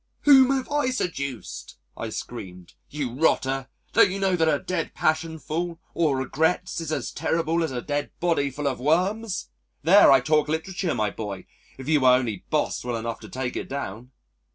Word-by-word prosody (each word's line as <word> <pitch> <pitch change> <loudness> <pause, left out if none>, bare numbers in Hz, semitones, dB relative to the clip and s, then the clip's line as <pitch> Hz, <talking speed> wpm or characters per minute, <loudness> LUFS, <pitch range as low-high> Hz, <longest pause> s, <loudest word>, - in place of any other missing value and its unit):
"Whom 265 -3 +7
have 270 -1 0
I 290 -3 +1
seduced?" 130 - -4 0.2
I - - -5
screamed. 90 -1 -8 0.2
"You 140 -5 -4
rotter, 135 -2 +1 0.3
don't - - +6
you 190 - -3
know 195 -2 +1
that 165 -2 +2
a - - +3
dead 180 -3 -3
passion 160 +1 0
full 165 +2 -4 0.2
of 155 -5 +2
regrets 160 +7 0
is 160 -2 -4
as 155 - -2
terrible 165 +1 0
as 160 - -2
a 125 -2 -4
dead 145 -1 -2
body 165 -5 +1
full 145 +2 -3
of 130 -3 -2
worms? 185 - 0 0.3
There, 190 +4 +7
I 135 - +7
talk 150 +3 +2
literature, 170 +3 -2
my 105 -2 0
boy, 100 -4 -6 0.3
if 130 0 -9
you 155 -1 +4
were 130 -1 +6
only 115 -7 -2
Boswell 120 -1 -1
enough 115 0 -4
to - - -11
take 130 -1 -4
it - - -4
down.... 125 -3 -5
150 Hz, 180 wpm, -25 LUFS, 130-170 Hz, 0.3 s, Whom